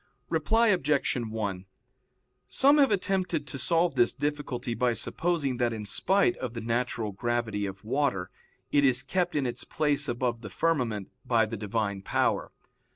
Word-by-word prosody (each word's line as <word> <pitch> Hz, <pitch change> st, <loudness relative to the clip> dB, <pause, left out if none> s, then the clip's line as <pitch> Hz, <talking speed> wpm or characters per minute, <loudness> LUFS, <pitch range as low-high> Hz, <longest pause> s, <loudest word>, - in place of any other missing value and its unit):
Reply 225 Hz, +9 st, +3 dB
Obj. 150 Hz, -7 st, +2 dB
1: 110 Hz, -6 st, -3 dB, 0.8 s
Some 280 Hz, +2 st, +4 dB
have 275 Hz, -, +6 dB
attempted 190 Hz, -6 st, 0 dB
to 135 Hz, -1 st, -6 dB
solve 170 Hz, +5 st, +2 dB
this 120 Hz, -, +3 dB
difficulty 140 Hz, -3 st, -3 dB
by 125 Hz, 0 st, +1 dB
supposing 145 Hz, +2 st, -1 dB
that 120 Hz, -1 st, +1 dB
in 110 Hz, -2 st, -5 dB
spite 185 Hz, -, +2 dB
of 125 Hz, -2 st, -5 dB
the -, -, -3 dB
natural 115 Hz, -1 st, -1 dB
gravity 110 Hz, -1 st, -1 dB
of 95 Hz, +2 st, -9 dB
water, 120 Hz, -7 st, 0 dB, 0.4 s
it 145 Hz, -, +4 dB
is 130 Hz, -1 st, +3 dB
kept 180 Hz, -3 st, -1 dB
in 145 Hz, -3 st, +1 dB
its 120 Hz, -, -3 dB
place 145 Hz, -2 st, 0 dB
above 120 Hz, -1 st, -1 dB
the 105 Hz, -, -7 dB
firmament 120 Hz, -, -1 dB
by 115 Hz, -2 st, +3 dB
the 110 Hz, +2 st, -5 dB
Divine 105 Hz, -1 st, -2 dB
power. -, -, 0 dB
125 Hz, 155 wpm, -28 LUFS, 110-150 Hz, 0.8 s, have